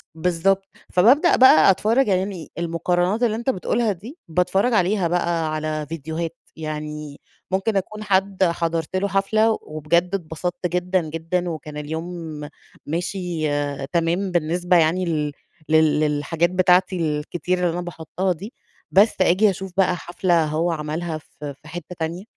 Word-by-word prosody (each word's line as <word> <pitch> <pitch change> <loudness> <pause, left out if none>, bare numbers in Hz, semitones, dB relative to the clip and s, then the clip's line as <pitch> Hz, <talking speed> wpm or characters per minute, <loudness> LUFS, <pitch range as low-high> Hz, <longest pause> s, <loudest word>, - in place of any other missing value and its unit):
بالضبط، 180 +3 +1 0.3
فببدأ 255 - +5
بقى 195 -9 +7
أتفرّج، 225 +7 +2
يعني 190 -3 -1
المقارنات 175 +5 0
اللي 220 -2 +2
أنت 235 +4 -2
بتقولها 225 +1 0
دي 220 - -9
باتفرج 180 +8 +1
عليها 190 -2 +2
بقى 170 -2 0
على 155 0 -2
ڤيديوهات، 160 +2 -3 0.3
يعني 150 -1 -6 0.3
ممكن 195 +2 +1
أكون 215 +3 -4
حد 195 -1 +1
حضرت 165 0 -1
له 195 +2 +1
حفلة 215 +3 +2
وبجد 170 +5 0
أتبسطت 175 +1 -3
جدًا 180 +1 0
جدًا 170 +3 -2
وكان 150 -2 -6
اليوم 160 +4 -4 0.7
ماشي 175 0 -2 0.4
تمام 175 +4 0
بالنسبة 175 +2 +2
يعني 170 +3 +2
لل 150 -3 -1 0.4
لل 155 -1 +4
للحاجات 155 +3 +1
بتاعتي 185 0 +3
الكتير 160 +2 -1
اللي 180 - +2
أنا 175 +2 -2
باحطها 175 +2 -2
دي، 195 +8 -9 0.4
بس 205 +4 +5
أجي 190 +4 +4
أشوف 190 0 -5
بقى 185 -2 +3
حفلة 175 -1 +1
هو 160 +3 0
عملها 155 +1 -3
في 145 -1 -9
في 155 - -14
حتّة 175 +2 -8
تانية، 170 +4 -3
175 Hz, 140 wpm, -22 LUFS, 160-190 Hz, 0.7 s, بقى